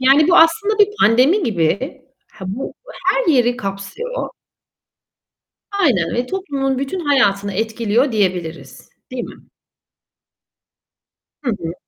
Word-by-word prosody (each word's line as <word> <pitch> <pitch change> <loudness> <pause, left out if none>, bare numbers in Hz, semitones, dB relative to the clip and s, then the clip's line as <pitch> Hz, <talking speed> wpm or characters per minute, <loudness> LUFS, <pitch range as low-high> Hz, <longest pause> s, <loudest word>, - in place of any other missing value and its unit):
Yani 275 +5 +5
bu 360 - +5
aslında 405 +6 +4
bir 410 - +6
pandemi 255 - +4
gibi. 230 - -1 0.3
Ha, 190 - -10
bu 225 +8 -4 0.3
her - - +2
yeri 245 -2 +3
kapsıyor. 260 - -5 1.5
Aynen 175 - +2
ve 245 +1 -1
toplumun 275 -8 -2
bütün 275 +7 -3
hayatını 205 - +2
etkiliyor 225 +4 0
diyebiliriz, 170 -9 -3 0.2
değil 255 -1 -4
mi? - - -12 2.0
Hı 255 - 0
hı. 170 -6 -4
250 Hz, 110 wpm, -19 LUFS, 200-305 Hz, 2.0 s, bir